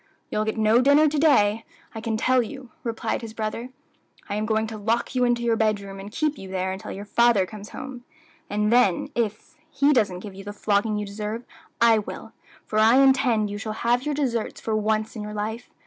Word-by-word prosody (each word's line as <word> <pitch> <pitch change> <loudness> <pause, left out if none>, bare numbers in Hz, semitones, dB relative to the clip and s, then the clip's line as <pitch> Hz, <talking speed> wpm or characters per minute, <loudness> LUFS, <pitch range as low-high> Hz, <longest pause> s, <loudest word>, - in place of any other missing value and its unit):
"You'll 215 - 0
get 220 +1 -2
no 220 +2 +4
dinner 285 +4 +5
to 300 +1 -1
day, 225 -8 +4 0.3
I 220 - -6
can 225 -1 -1
tell 255 +3 +3
you," 250 +1 -8
replied 230 0 -2
his 225 -1 -8
brother. 225 +3 -4 0.6
"I - - -4
am 210 +1 -1
going 220 0 +1
to 220 0 -6
lock 225 +5 0
you 250 -1 +2
into 240 -1 +1
your 230 -1 +2
bedroom, 205 -3 -1
and 200 +2 -8
keep 305 +4 -1
you 190 - -9
there 190 0 -2
until 190 +1 -6
your 200 +1 -7
father 235 -3 +3
comes 210 +1 -10
home; 260 -2 -8 0.5
and 210 +2 +1
then 240 -8 +3
if 225 +2 -3 0.2
he 285 0 +3
doesn't 200 -8 +1
give 205 -1 -8
you 195 +1 -10
the 205 +1 -7
flogging 210 +1 0
you 210 - -2
deserve, 210 +3 -5 0.4
I 230 -1 +5
will; 210 - -8 0.3
for 215 - -1
I 220 +3 +6
intend 260 -6 +4
you 205 - -5
shall 220 0 -4
have 240 +2 +1
your 300 0 -1
deserts 245 -6 -2
for 220 - -2
once 215 +1 0
in 215 - -5
your 210 0 -6
life. 220 +3 -4
220 Hz, 215 wpm, -24 LUFS, 210-240 Hz, 0.6 s, I